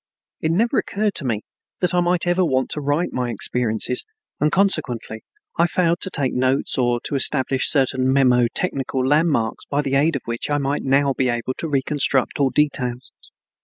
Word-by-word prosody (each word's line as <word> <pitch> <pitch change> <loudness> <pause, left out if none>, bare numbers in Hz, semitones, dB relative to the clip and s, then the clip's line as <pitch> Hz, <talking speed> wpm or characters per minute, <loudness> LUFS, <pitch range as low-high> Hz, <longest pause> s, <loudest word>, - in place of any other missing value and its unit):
It 160 - -1
never 230 +10 +2
occurred 210 0 -1
to 155 - -3
me 110 -4 -2 0.4
that 180 - 0
I 180 - +3
might 175 0 +1
ever 175 +1 +2
want 130 -6 0
to 150 - -3
write 145 +5 -1
my 125 -1 -2
experiences, 120 +1 0 0.4
and 150 +1 +2
consequently 125 - -1 0.4
I 170 - +5
failed 170 -1 +1
to 190 - -3
take 140 -8 -1
notes 130 +2 0
or 120 -2 +1
to - - -5
establish 135 -1 +2
certain 130 -2 +2
mnemo 125 -3 +4
technical 135 -6 -2
landmarks 145 -6 +1
by 145 +1 -1
the 135 -1 -3
aid 145 +3 +2
of 135 - -4
which 115 +3 -4
I 145 - +1
might 140 0 -1
now 135 +1 +2
be 130 -1 0
able 120 +2 -2
to 165 - -3
reconstruct 140 -1 0
all 140 -1 +3
details. 130 -4 -1
135 Hz, 185 wpm, -21 LUFS, 125-160 Hz, 0.4 s, I